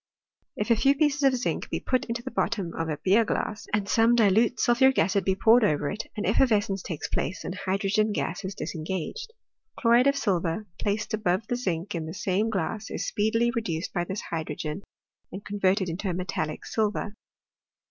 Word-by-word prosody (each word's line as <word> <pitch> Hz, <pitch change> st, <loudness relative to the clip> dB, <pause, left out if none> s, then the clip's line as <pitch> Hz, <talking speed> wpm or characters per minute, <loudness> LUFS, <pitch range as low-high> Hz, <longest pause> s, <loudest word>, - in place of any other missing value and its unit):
If 210 Hz, +3 st, -1 dB
a -, -, +7 dB
few 275 Hz, +5 st, +3 dB
pieces 295 Hz, -1 st, +1 dB
of 270 Hz, -2 st, +4 dB
zinc 245 Hz, -, -2 dB
be -, -, -2 dB
put 255 Hz, -, 0 dB
into 235 Hz, 0 st, -4 dB
the -, -, -6 dB
bottom 190 Hz, -2 st, -1 dB
of 165 Hz, 0 st, -3 dB
a 150 Hz, -, -2 dB
beer 200 Hz, +5 st, +5 dB
glass 215 Hz, 0 st, -3 dB
and 205 Hz, -1 st, 0 dB
some 230 Hz, +3 st, +4 dB
dilute 225 Hz, +2 st, +3 dB
sulphuric 265 Hz, +2 st, +4 dB
acid 190 Hz, +3 st, +2 dB
be 190 Hz, +1 st, +1 dB
poured 230 Hz, +4 st, +5 dB
over 150 Hz, -7 st, +1 dB
it 210 Hz, -, -5 dB
an 205 Hz, -, -2 dB
effervescence 205 Hz, -3 st, +2 dB
takes 165 Hz, -5 st, -5 dB
place, 190 Hz, -, -3 dB
and -, -, -4 dB
hydrogen 195 Hz, +3 st, 0 dB
gas 195 Hz, -1 st, -3 dB
is 190 Hz, +1 st, -5 dB
disengaged. 185 Hz, -, -4 dB, 0.5 s
Chlo 230 Hz, -, +2 dB
ride 245 Hz, +3 st, +6 dB
of 280 Hz, -, +3 dB
silver, 185 Hz, -5 st, -1 dB
placed 210 Hz, +1 st, -2 dB
above 210 Hz, -1 st, 0 dB
the 245 Hz, -, -1 dB
zinc 190 Hz, -5 st, -2 dB
in 165 Hz, -2 st, -3 dB
the 160 Hz, -, -6 dB
same 200 Hz, +2 st, 0 dB
glass, 215 Hz, +2 st, -3 dB
is -, -, -3 dB
speedily 225 Hz, +3 st, +1 dB
reduced 185 Hz, -8 st, -3 dB
by 175 Hz, -, 0 dB
this 190 Hz, +4 st, -4 dB
hydrogen 155 Hz, +1 st, -4 dB, 0.5 s
and 195 Hz, +2 st, -8 dB
con 205 Hz, 0 st, -5 dB
verted 190 Hz, 0 st, +2 dB
into 180 Hz, +3 st, -3 dB
metallic 180 Hz, -4 st, -3 dB
silver. 210 Hz, -1 st, -1 dB
205 Hz, 190 wpm, -27 LUFS, 180-230 Hz, 0.5 s, a